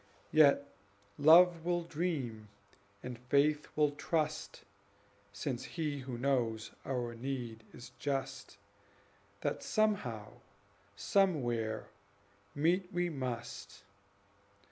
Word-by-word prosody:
Yet 145 -2 +5 0.5
Love 165 +3 +7
will 175 0 0
dream, 145 -10 -3 0.6
and 125 -2 -6
Faith 145 +4 +2
will 150 -1 +3
trust, 155 +1 -2 0.7
(Since 120 +5 -3
He 150 -4 -3
who 130 -2 -6
knows 115 -4 0
our 125 -3 -2
need 120 -2 -5
is 120 - -11
just,) 135 -5 -3 0.8
That - - -1
somehow, 170 - -1 0.6
somewhere, 120 - +1 0.7
meet 180 +5 +1
we 175 -1 0
must. 115 -7 -5
140 Hz, 90 wpm, -33 LUFS, 120-160 Hz, 0.8 s, Love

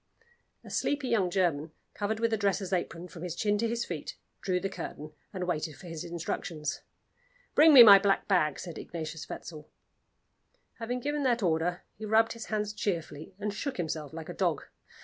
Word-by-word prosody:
A - - -11
sleepy 290 -2 0
young 195 -6 +2
German, 165 -4 0 0.2
covered 215 +1 -2
with 230 0 +1
a - - +2
dresser's 200 -2 0
apron 175 -1 -2
from 170 - -11
his 175 -2 -4
chin 205 +2 +1
to 230 - +1
his 235 0 -1
feet, 165 -4 -5 0.3
drew 185 -2 0
the 195 - -2
curtain, 155 -5 -7 0.2
and 185 -3 -4
waited 160 -4 -2
for 185 - -14
his 165 -2 -6
instructions. 165 -2 -4 0.7
"Bring 315 +1 +7
me 260 -5 +12
my 200 -3 +10
black 195 0 +1
bag," 155 -7 +2
said 170 -3 -7
Ignatius 160 -2 -6
Wetzel. 155 -2 -8 1.1
Having 245 +2 -3
given 290 +2 -1
that 245 -4 +1
order, 175 +1 0 0.2
he 220 - -5
rubbed 220 +1 +3
his 230 -1 -8
hands 210 -1 -2
cheerfully, 165 -5 -4
and 210 0 -3
shook 265 +6 -4
himself 155 -4 -3
like 160 -1 -7
a - - -4
dog. - - 0
185 Hz, 185 wpm, -30 LUFS, 165-220 Hz, 1.1 s, me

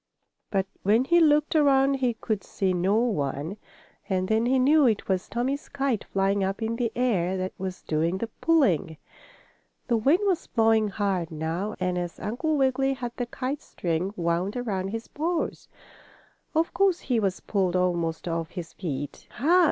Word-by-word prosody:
But 195 -2 +1 0.2
when 215 +5 +3
he 345 +5 +4
looked 300 -1 +3
around 275 -2 +4
he 250 -3 0
could 215 -3 -3
see 190 -2 -1
no 185 +3 +1
one, 165 - -1 0.5
and 185 -1 0
then 220 +3 +2
he 265 +1 +3
knew 285 +2 +5
it 220 -3 0
was 190 -1 -1
Tommie's 255 +6 -2
kite, 270 -6 -1
flying 195 +1 +1
up 195 +1 -1
in 230 +1 -1
the 235 -2 0
air, 190 -7 +1
that 185 0 -3
was 185 -1 -5
doing 165 +4 0
the 230 - -2
pulling. 215 - +1 0.9
The 235 - +3
wind 280 - +3
was 380 -4 0
blowing 225 -2 +3
hard 195 -4 -1
now, 165 +6 -3
and 180 -1 0
as 175 -1 -5
Uncle 295 +9 -1
Wiggily 270 0 +2
had 245 -2 -5
the 245 - -2
kite 260 +4 -4
string 175 +2 -2
wound 175 +5 0
around 200 -6 -2
his 225 +3 -5
paws, 330 +3 -2 0.9
of 325 +1 +1
course 390 -3 +2
he 245 -3 0
was 195 -3 0
pulled 190 -3 0
almost 175 -2 0
off 165 -1 -2
his 175 -4 -7
feet. 145 -6 -5
"Ha! 335 +8 +3
215 Hz, 170 wpm, -26 LUFS, 185-265 Hz, 0.9 s, knew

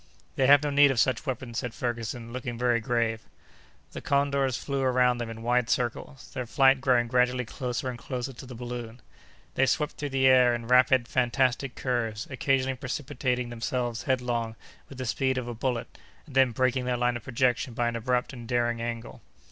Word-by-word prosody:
"They 130 - +2
have 145 +1 +7
no 145 - -1
need 145 0 +6
of 135 -3 0
such 130 +5 +1
weapons," 120 -3 -3
said 125 -3 -5
Ferguson, 115 -1 -4
looking 125 -2 -5
very 120 -1 +2
grave. 115 -1 0 0.7
The - - -7
condors 140 -2 +1
flew 140 -1 -3
around 125 -1 +3
them 120 -1 -4
in 115 0 -8
wide 120 0 +1
circles, 125 +2 -3
their 125 -2 -4
flight 135 +1 +4
growing 125 -2 +3
gradually 125 +1 +1
closer 125 +2 -4
and 125 -2 -5
closer 130 +1 -4
to 125 +2 -11
the 125 - -9
balloon. 120 0 -7 0.5
They 135 - +2
swept 150 +3 0
through 145 - -3
the 135 -1 +1
air 125 -2 +6
in 115 -1 -6
rapid, 125 0 +4
fantastic 125 +1 +1
curves, 115 -4 -2
occasionally 130 0 0
precipitating 125 -2 -2
themselves 120 0 -2
headlong 120 -4 -1 0.3
with 135 - -11
the 130 - -4
speed 130 +2 0
of 125 -2 -3
a 120 - -4
bullet, 120 +1 -3 0.3
and 145 - -14
then 135 -1 +5
breaking 130 +2 0
their 125 -1 0
line 120 0 +1
of 120 - -6
projection 125 -1 0
by 120 0 +1
an 120 - -2
abrupt 125 +3 -1
and 120 -3 -9
daring 120 -1 0
angle. 115 -1 -5
125 Hz, 190 wpm, -27 LUFS, 120-130 Hz, 0.7 s, have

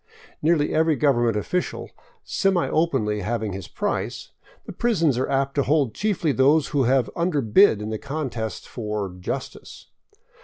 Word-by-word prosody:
Nearly 155 -1 +2
every 160 0 +3
government 120 -6 +2
of 105 - -4
ficial 180 0 -2 0.3
semi 195 -3 +1
openly 130 -11 0
having 110 0 -2
his 95 -2 -7
price, - - -3 0.3
the - - -7
prisons 170 - +1
are 130 - -1
apt 135 0 0
to 145 - +1
hold 140 -4 +1
chiefly 190 -7 0
those 140 +3 +3
who 140 -3 +1
have 130 -1 +2
underbid 150 - +3
in 110 - -4
the 110 - -3
contest 130 -7 -4
for 105 -5 -4
" - - -14
justice." 130 +8 -7
135 Hz, 155 wpm, -23 LUFS, 110-160 Hz, 0.3 s, every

